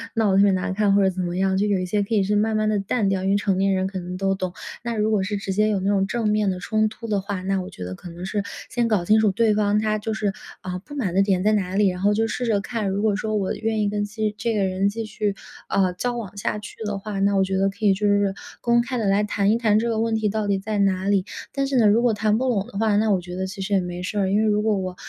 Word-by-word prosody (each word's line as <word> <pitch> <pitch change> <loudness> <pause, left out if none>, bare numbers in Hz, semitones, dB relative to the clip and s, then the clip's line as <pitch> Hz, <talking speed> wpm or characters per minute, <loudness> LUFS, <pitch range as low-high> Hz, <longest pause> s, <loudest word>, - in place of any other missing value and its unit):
闹 220 -3 +2
得 190 - +3
特 200 - +6
别 200 - +5
难 185 0 -1
看 205 0 +2
或 200 - +4
者 190 - +4
怎 185 0 -4
么 175 0 -3
样， 190 0 +1
就 200 - +2
有 205 -2 +2
一 185 - -2
些 205 +3 0
可 200 - -5
以 205 - +4
是 205 +2 0
慢 215 +1 +1
慢 215 0 +1
地 210 -1 +1
淡 200 +1 0
掉， 190 -1 -1
因 190 - +1
为 - - +3
成 195 -2 0
年 195 +1 +2
人 190 0 0
可 190 -1 -5
能 180 0 -6
都 195 0 +1
懂。 185 -2 -4 0.3
那 235 -1 -2
如 215 0 +1
果 205 -3 +2
是 205 +2 -2
直 195 -1 -3
接 210 +3 +2
有 210 -2 +1
那 195 +1 -1
种 195 -1 +2
正 225 +1 -1
面 210 -1 +2
的 180 - -4
冲 215 +3 +1
突 225 +1 -9
的 210 -2 +1
话， 195 -1 -4
那 195 +1 0
我 185 - -7
觉 90 - -8
得 90 +1 -5
可 175 - -11
能 170 +1 -9
是 200 +1 -2 0.3
先 240 -1 0
搞 210 -6 +1
清 215 +5 +4
楚 215 -2 +3
对 215 +2 +2
方 210 0 +2
他 215 0 0
就 220 +1 -3
是， 210 -2 -1 0.3
呃， 180 -1 -4
不 290 - -11
满 210 -11 -2
的 195 - +5
点 195 -2 +1
在 215 - +3
哪 190 -3 -1
里， 205 0 +4
然 180 0 -4
后 205 +1 +3
就 225 +2 +1
试 245 +3 -3
着 215 -4 +1
看， 220 -1 -3
如 195 +1 -1
果 215 -2 +2
说 215 +1 -2
我 195 -3 0
愿 220 0 -1
意 205 - +1
跟 205 0 -1
继 215 0 -2
这 230 +2 -1
个 205 -2 +1
人 190 +1 +1
继 225 +2 -4
续， 215 -1 -2 0.4
呃， 190 -2 +2
交 245 +7 -2
往 205 -4 -7
下 210 +1 -2
去 210 - -10
的 205 -1 -2
话， 200 0 -5
那 200 +1 +2
我 195 - +4
觉 190 0 -1
得 195 +1 +2
可 - - -21
以 200 - +6
就 210 +2 -2
是 205 -1 +2 0.3
公 235 0 +3
开 250 0 -3
地 220 - -1
来 200 +2 +3
谈 205 -1 +1
一 225 - +3
谈 215 -3 +3
这 235 +1 -1
个 225 -1 0
问 225 0 0
题 220 -1 0
到 215 0 -2
底 200 -1 +1
在 210 +2 -3
哪 190 -2 +1
里。 195 -2 +2 0.3
但 275 0 -1
是 270 -1 0
呢， 220 -3 +5
如 225 +4 +4
果 240 -2 +3
谈 215 +1 +1
不 260 - 0
拢 210 -5 0
的 220 - -9
话， 215 -1 +2
那 215 +1 +2
我 190 - +3
觉 180 0 -8
得 190 +1 -2
其 195 +2 -9
实 200 +2 -2
也 195 - +4
没 180 0 -5
事 205 +3 -2
儿， 190 -1 +1
因 205 - +3
为 220 - +2
如 210 -1 +2
果 215 -1 +1
我 185 -1 -4
205 Hz, 350 characters per minute, -23 LUFS, 195-215 Hz, 0.4 s, 特